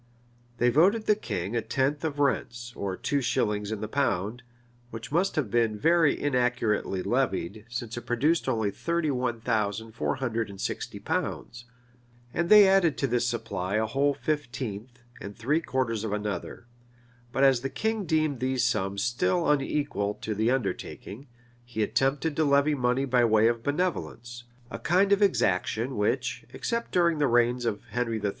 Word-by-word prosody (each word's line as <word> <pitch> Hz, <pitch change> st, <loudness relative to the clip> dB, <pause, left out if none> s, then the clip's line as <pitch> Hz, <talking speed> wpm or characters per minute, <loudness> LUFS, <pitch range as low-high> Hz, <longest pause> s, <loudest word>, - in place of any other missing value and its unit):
They 120 Hz, +1 st, +3 dB
voted 195 Hz, -, +3 dB
the 210 Hz, -, +5 dB
king 105 Hz, -, -4 dB
a 115 Hz, -, +1 dB
tenth 135 Hz, +6 st, -1 dB
of 155 Hz, -3 st, -2 dB
rents, 120 Hz, -4 st, -1 dB
or 95 Hz, -2 st, -3 dB
two 140 Hz, -1 st, -1 dB
shillings 105 Hz, -4 st, 0 dB
in 110 Hz, -, -4 dB
the 110 Hz, -, -3 dB
pound; 110 Hz, -4 st, -1 dB, 0.5 s
which 115 Hz, +2 st, -8 dB
must 175 Hz, +5 st, +1 dB
have 130 Hz, -10 st, -1 dB
been 115 Hz, -2 st, +1 dB
very 165 Hz, +4 st, +3 dB
inaccurately 125 Hz, -8 st, 0 dB
levied, 105 Hz, +6 st, -1 dB
since 120 Hz, -1 st, -5 dB
it 120 Hz, -, -5 dB
produced 145 Hz, +5 st, +1 dB
only 110 Hz, -5 st, 0 dB
thirty 170 Hz, -, -1 dB
one 125 Hz, -3 st, -2 dB
thousand 110 Hz, -1 st, -1 dB
four 115 Hz, -, -2 dB
hundred 115 Hz, -4 st, -2 dB
and 100 Hz, -1 st, -10 dB
sixty -, -, -4 dB
pounds; 120 Hz, 0 st, -4 dB, 0.7 s
and 170 Hz, +1 st, -1 dB
they 210 Hz, -2 st, +9 dB
added 190 Hz, -5 st, +3 dB
to -, -, 0 dB
this 120 Hz, -2 st, +1 dB
supply 100 Hz, -5 st, -3 dB
a 110 Hz, +1 st, +2 dB
whole 140 Hz, +5 st, +1 dB
fifteenth, 125 Hz, -5 st, -4 dB, 0.2 s
and 100 Hz, 0 st, -8 dB
three 145 Hz, +8 st, +1 dB
quarters 120 Hz, -7 st, -1 dB
of 110 Hz, -, -3 dB
another;[] 105 Hz, +2 st, -4 dB, 0.7 s
but 135 Hz, +3 st, +1 dB
as 135 Hz, -3 st, +5 dB
the 135 Hz, -, -3 dB
king 220 Hz, +8 st, -2 dB
deemed 155 Hz, -4 st, 0 dB
these 130 Hz, 0 st, 0 dB
sums 100 Hz, -5 st, 0 dB
still 165 Hz, +8 st, +1 dB
unequal 140 Hz, -8 st, 0 dB
to 110 Hz, -, -4 dB
the 110 Hz, +3 st, +1 dB
undertaking, 125 Hz, 0 st, -3 dB, 0.4 s
he 120 Hz, -2 st, -2 dB
attempted 135 Hz, +7 st, 0 dB
to 160 Hz, -, +2 dB
levy 140 Hz, +1 st, +3 dB
money 125 Hz, 0 st, +1 dB
by 125 Hz, -2 st, +3 dB
way 110 Hz, -1 st, +4 dB
of 115 Hz, 0 st, 0 dB
benevolence, 120 Hz, -6 st, -3 dB, 0.3 s
a 115 Hz, -, -5 dB
kind 185 Hz, +10 st, +2 dB
of 200 Hz, +1 st, +4 dB
exaction 120 Hz, -, +1 dB
which, 120 Hz, +4 st, -1 dB
except 235 Hz, -1 st, -3 dB
during 170 Hz, -3 st, +2 dB
the 145 Hz, -, +3 dB
reigns 120 Hz, 0 st, +2 dB
of 105 Hz, -3 st, -2 dB
Henry 115 Hz, -2 st, -1 dB
III. 105 Hz, -1 st, -1 dB
120 Hz, 170 wpm, -27 LUFS, 110-145 Hz, 0.7 s, they